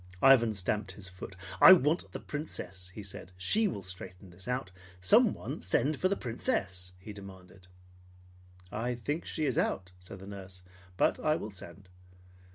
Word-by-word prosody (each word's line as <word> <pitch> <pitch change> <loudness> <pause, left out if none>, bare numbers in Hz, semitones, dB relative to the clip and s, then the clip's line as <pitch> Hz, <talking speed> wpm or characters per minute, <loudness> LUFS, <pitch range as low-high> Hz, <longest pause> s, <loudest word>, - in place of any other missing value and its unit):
Ivan 120 -5 +7
stamped 100 +1 -1
his 95 -1 -6
foot. 95 +1 -9 0.3
"I 185 - +12
want 160 -1 +2
the - - -5
Princess!" 95 - -6
he 105 +2 -8
said. 95 -2 -9
"She 210 - +3
will 100 - -4
straighten 95 0 -9
this 90 +4 -13
out. 125 -6 -2 0.3
Send 95 0 +5
someone - - -6 0.3
for 185 - +2
the 200 - +2
Princess!" 95 -6 -2
he 100 +3 -9
demanded. 95 -2 -12 1.0
"I 120 +3 -1
think 145 +8 -3
she 155 - -2
is 130 - +1
out," 90 -1 -1
said 90 +2 -10
the 95 - -11
nurse; 95 -2 -9 0.3
"but - - +3
I 155 -1 +2
will 110 -8 -5
send." 95 0 -10
100 Hz, 165 wpm, -31 LUFS, 95-125 Hz, 1.0 s, I